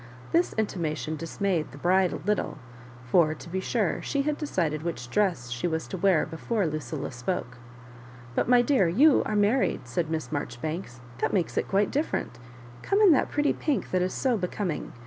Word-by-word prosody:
This 345 +2 +2
intimation 160 -7 -2
dismayed 165 0 -2
the - - -11
bride 185 +4 +3
a - - -3
little; 210 -6 -1 0.5
for, 155 +3 +3
to 170 - -11
be 190 +2 -2
sure, 205 0 0
she 280 -1 -1
had 300 +1 0
decided 170 - -1
which 125 -8 -5
dress 170 -12 0
she 120 +7 -1
was 160 -1 -2
to - - -4
wear 190 -3 +3
before 190 +6 -2
Lucilla 155 -6 -4
spoko. 125 -1 -4 0.8
"But, - - 0
my 245 -1 +6
dear, 245 -8 +3
you 270 - +5
are 215 - -1
married," 205 - +2
said 155 +7 -1
Miss 160 -1 -3
Marjoribanks; 145 -1 -4
" 120 - -18
that 145 - 0
makes 180 -4 0
it - - 0
quite 200 +1 +1
different; 275 - -2 0.4
come' 400 - +1
in 415 -4 +7
that 285 - +3
pretty 290 0 +1
pink 295 -3 -2
that 185 - +2
is 185 +1 0
so 255 -4 +1
becoming. 180 -2 -3
180 Hz, 185 wpm, -27 LUFS, 155-215 Hz, 0.8 s, in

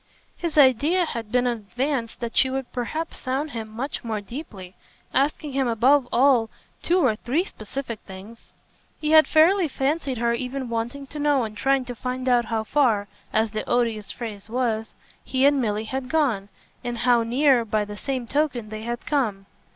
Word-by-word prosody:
His 335 -3 -4
idea 295 +6 +5
had 230 -8 -5
been 250 0 +2
in 240 -1 0
advance 240 +3 -2
that 235 -1 -6
she 265 - +4
would 265 -1 -4
perhaps 310 +7 -3
sound 275 +4 -2
him 225 -3 -5
much 245 +6 -5
more 220 -2 -2
deeply, 200 - -9 0.4
asking 285 +2 0
him 270 -1 0
above 245 +4 +3
all 245 -3 +4 0.3
two 350 - +2
or 220 -4 +3
three 260 +10 0
specific 230 - -6
things. 195 +5 -12 0.5
He 305 0 -1
had 315 0 +7
fairly 340 +3 +5
fancied 275 -1 -1
her 235 +1 +1
even 255 +1 -3
wanting 235 +5 -3
to 295 +2 -8
know 290 -3 +2
and 215 -1 -5
trying 270 +4 +1
to 245 - -5
find 255 +1 -4
out 245 -2 +4
how 220 -1 -1
far, 220 -6 +2 0.2
as 220 0 +1
the 215 0 -3
odious 230 -4 0
phrase 215 -4 -7
was, 230 -2 -1 0.3
he 260 +1 +1
and 285 -1 +4
Milly 215 -2 -1
had 260 +3 -4
gone, 250 -11 +1 0.3
and 240 -1 -3
how 240 0 +3
near, 250 +2 +3
by 215 -1 0
the 205 0 -8
same 260 +2 -3
token, 260 -4 -1
they 215 0 -6
had 235 +1 -5
come. 220 -10 0
245 Hz, 180 wpm, -24 LUFS, 225-275 Hz, 0.5 s, had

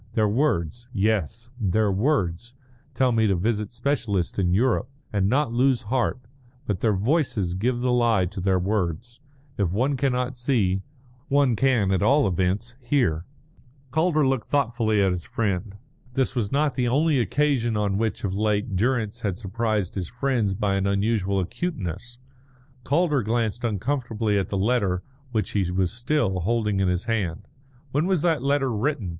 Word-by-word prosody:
Their 110 -1 +2
words 120 - 0
yes 110 - -1
their 105 0 +1
words 110 - 0 0.4
tell 130 -1 +3
me 110 -2 +3
to 100 - +2
visit 105 +2 -1
specialists 120 - -1
in 90 -2 +2
Europe, 120 +5 +2 0.2
and 100 -1 +2
not 130 -1 +1
lose 130 0 +2
heart, 125 +4 0 0.5
but 100 -4 -2
their 110 -1 +2
voices 110 - 0
give 120 +6 -1
the 125 0 +1
lie 115 -6 +3
to 95 +2 -6
their 95 0 +2
words. 100 - -2 0.4
If 100 -4 +2
one 125 +10 +1
cannot 125 -1 0
see, 110 -7 +1 0.5
one 140 -3 +3
can 115 -5 +2
at 95 - +1
all 135 +3 +4
events 95 +7 -1
hear." 120 - +1 0.7
Calder 160 0 +2
looked 130 -3 -1
thoughtfully 115 -6 +1
at 95 - +2
his 90 -2 -3
friend. 100 -2 -2 0.4
This 135 0 +1
was 115 -6 -1
not 145 0 +1
the 125 -1 0
only 145 +3 +2
occasion 125 -3 +1
on 100 -1 0
which 110 -1 -2
of 95 -3 -1
late 105 -1 0
Durrance 115 +1 0
had 100 -5 -2
surprised 105 -1 -2
his 90 -4 -4
friends 120 -5 0
by 100 0 0
an 95 0 0
unusual 100 -1 +1
acuteness. 115 - -4 0.7
Calder 150 -2 +2
glanced 115 +1 -1
uncomfortably 115 -1 -1
at 95 - -3
the 100 - -2
letter 100 -4 +1 0.3
which 110 -3 -1
he 95 -4 0
was 90 -1 0
still 120 -5 0
holding 105 +1 0
in 95 - +2
his 90 0 -1
hand. 100 -8 -2 0.5
"When 150 +6 +1
was 185 -5 +1
that 165 -5 +2
letter 135 -2 +1
written?" 120 - -1
110 Hz, 160 wpm, -24 LUFS, 95-130 Hz, 0.7 s, all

